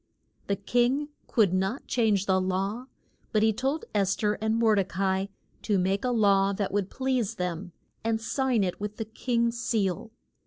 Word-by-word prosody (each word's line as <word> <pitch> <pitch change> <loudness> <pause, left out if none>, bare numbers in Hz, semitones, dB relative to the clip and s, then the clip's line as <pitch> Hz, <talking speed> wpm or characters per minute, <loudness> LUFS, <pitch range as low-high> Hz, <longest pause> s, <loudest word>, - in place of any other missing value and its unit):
The 200 - +1
king 245 +8 +1 0.2
could 210 -7 +3
not 190 +8 -1
change 215 -5 +2
the 190 -1 +2
law, 195 +6 -2 0.4
but 215 -1 +2
he 220 0 +4
told 270 +8 -1
Es 195 -2 +2
ther 210 -1 +1
and 220 0 +1
Mor 225 -1 +4
de 200 -2 +3
ca 190 +1 -4
i 190 +1 -2 0.3
to 205 - +1
make 190 +2 +1
a 250 - +1
law 200 -4 +3
that 200 0 -2
would 200 -1 0
please 260 -5 -1
them 180 0 -3 0.3
and 225 0 +1
sign 250 -1 +1
it 180 +1 -3
with 210 0 -4
the 225 - -3
king's 235 +1 -1
seal. 215 -3 -1
210 Hz, 185 wpm, -27 LUFS, 195-235 Hz, 0.4 s, he